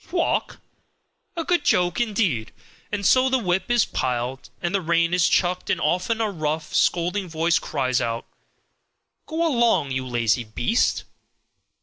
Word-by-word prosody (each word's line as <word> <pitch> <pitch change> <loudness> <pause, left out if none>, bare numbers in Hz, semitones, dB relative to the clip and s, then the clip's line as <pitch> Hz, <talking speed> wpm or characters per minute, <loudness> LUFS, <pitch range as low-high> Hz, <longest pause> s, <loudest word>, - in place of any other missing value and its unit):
Walk! 345 -1 -1 0.8
A 335 - -2
good 350 -2 +1
joke 180 +5 +2
indeed! 200 - 0 0.4
And 205 -1 -3
so 260 +4 +5
the 260 - +2
whip 185 -4 -1
is 240 -2 +3
plied 125 +1 -3
and 175 -1 -3
the 195 - +1
rein 170 0 +1
is 180 -1 +3
chucked 180 0 0
and - - +1
often 185 +8 0
a 220 -2 0
rough, 155 -2 -3
scolding 180 +2 +1
voice 165 +1 +1
cries 130 -4 -1
out, 115 -1 -3 1.0
"Go 330 +1 -1
along, 235 - +2
you 130 0 -2
lazy 120 -1 +1
beast!" 120 - 0
175 Hz, 145 wpm, -23 LUFS, 135-225 Hz, 1.0 s, so